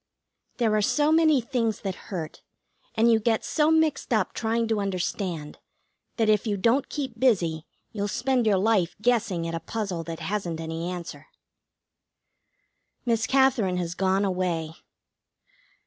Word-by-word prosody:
There 225 -3 +2
are 210 - +2
so 295 +8 +2
many 315 -4 +4
things 230 -3 -1
that 195 -2 -3 0.2
hurt, 165 -5 -5 0.5
and 230 +1 +4
you 225 - +4
get 220 0 0
so 305 -1 +2
mixed 320 -4 +1
up 215 -6 +1
trying 230 0 0
to 220 -2 +1
understand, 180 -5 -3 0.6
that 225 -2 +2
if 215 +1 +2
you 205 -1 0
don't 235 +7 +2
keep 265 -6 -5
busy 170 -11 +1 0.2
you'll 205 -2 -2
spend 245 +3 0
your 200 -2 +4
life 190 -4 +1
guessing 215 -7 +1
at 165 - -4
a 165 - -2
puzzle 185 -1 -4
that 165 -1 -6
hasn't 185 -5 -3
any 165 +1 -4
answer. 170 -4 -7 1.8
Miss 230 -2 +1
Katherine 260 -9 +3
has 175 -1 -2
gone 190 +2 +1
away. 180 -4 -1
210 Hz, 150 wpm, -26 LUFS, 180-235 Hz, 1.8 s, many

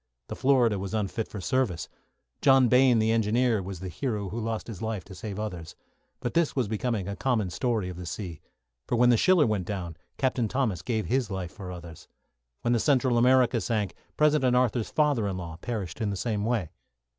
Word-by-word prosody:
The - - -4
"Florida" 125 -6 +3
was 100 +3 -4
unfit 105 +1 -2
for 105 - -7
service. 105 -4 0 0.5
John 135 -3 +5
Bayne, 125 0 +5
the 110 0 +2
engineer, 115 0 +2
was 95 -1 -7
the 95 - -4
hero 100 - -3
who 110 +5 -4
lost 110 -1 -3
his 110 -6 -8
life 110 -4 -3
to 95 - -11
save 100 +2 -6
others. 90 -5 -5 0.5
But 120 - -3
this 170 -2 +1
was 130 -5 +1
becoming 110 -2 -2
a 100 - -3
common 110 -6 0
story 110 +1 -1
of 90 -1 -6
the 90 -1 -7
sea; 85 -2 -6 0.5
for - - 0
when 120 +1 +5
the - - +5
"Schiller" 175 +5 +4
went 105 -6 -1
down, 90 -5 -4 0.2
Captain 130 -3 +1
Thomas 110 -7 -1
gave 110 0 -1
his 125 -2 0
life 95 -3 -4
for 95 -3 -8
others. 85 -3 -10 0.5
When 120 - +1
the 120 - +2
"Central 130 -1 +2
America" 125 -1 +4
sank, 105 -2 -1 0.2
President 150 -4 +3
Arthur's 120 -3 +1
father 145 -9 +2
in 95 -2 -3
law 85 -3 -6
perished 100 -3 -5
in 105 - 0
the 100 - -2
same 105 -1 -1
way. 110 -8 -1
110 Hz, 205 wpm, -27 LUFS, 95-125 Hz, 0.5 s, John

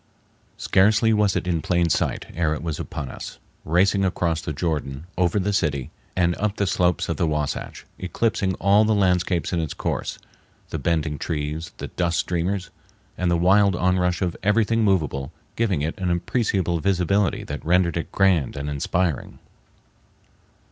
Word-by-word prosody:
Scarcely 110 +3 +3
was 105 -3 +2
it - - -1
in 85 -3 0
plain 85 +1 +1
sight - - 0
ere 80 -2 0
it 75 - -7
was 80 -1 -3
upon 75 -3 -5
us, - - -8 0.3
racing 95 +5 +2
across 85 -3 0
the 80 - -4
Jordan, 75 -2 -3
over 90 +2 +1
the 100 +2 0
city, 70 -8 -1 0.2
and 85 -1 +2
up 105 -1 -1
the 100 - 0
slopes 90 -1 +1
of 85 - -2
the 85 - +1
Wahsatch, 75 -2 -3
eclipsing 95 0 0
all 100 +3 +4
the 110 0 +2
landscapes 90 -3 +1
in 85 - +1
its 80 -3 -3
course—the - - -6
bending 80 -4 -1
trees, 80 +2 -3
the - - -6
dust 85 -1 -1
streamers, 90 +2 -1 0.4
and 90 -1 0
the 85 - +3
wild 95 +2 +4
onrush 90 0 +1
of 90 -2 -1
everything 115 +2 +2
movable 75 -9 0 0.2
giving 100 -10 0
it 80 +6 -3
an 90 -1 -1
appreciable 90 -1 0
visibility 100 +2 +1
that 75 - -6
rendered 85 +1 +2
it 85 - -3
grand 95 -8 +2
and 70 +1 -3
inspiring. 80 +3 -1
90 Hz, 160 wpm, -23 LUFS, 80-95 Hz, 0.4 s, all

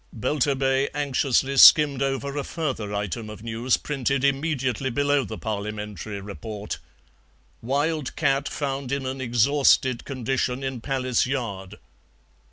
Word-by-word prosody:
Belturbet 135 +1 0
anxiously 135 -1 +1
skimmed 145 -1 +8
over 135 +1 -2
a 145 - -2
further 130 -11 -3
item 105 +1 -3
of 105 0 -10
news 115 +2 0
printed 140 -2 -1
immediately 135 -3 0
below 145 +2 +1
the 110 -2 -6
Parliamentary 105 -1 -5
report: 105 -2 -7 0.8
"Wild 145 +4 -1
cat 140 -2 +1
found 135 -2 -3
in 140 -1 -2
an 130 +1 -4
exhausted 130 +1 +3
condition 130 0 -2
in 130 -3 -4
Palace 130 -2 0
Yard." 105 -7 -4
130 Hz, 120 wpm, -24 LUFS, 115-140 Hz, 0.8 s, skimmed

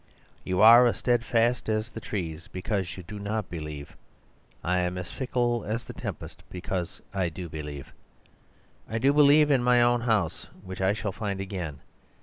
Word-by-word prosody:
You 90 0 0
are 120 +2 +9
steadfast 120 -1 +1
as 110 +1 -1
the - - -7
trees 85 -7 -5
because 95 -2 -3
you 90 - -8
do 105 +5 -8
not 105 -1 -3
believe. 75 -3 -7 0.7
I 90 +1 +1
am 90 0 -1
as 90 -1 -6
fickle 120 -3 -1
as 115 +3 -3
the - - -8
tempest - - -7
because 90 -1 -4
I 95 -3 0
do 85 +2 -7
believe. 75 -3 -7 1.0
I 110 - -2
do 135 +5 +3
believe 150 0 +6
in 130 -3 +3
my 125 0 +5
own 120 0 +3
house, 110 -8 0 0.2
which 95 0 -7
I 95 +1 +3
shall 105 -1 -3
find 100 -1 -4
again. 90 -7 -5
100 Hz, 165 wpm, -27 LUFS, 90-120 Hz, 1.0 s, are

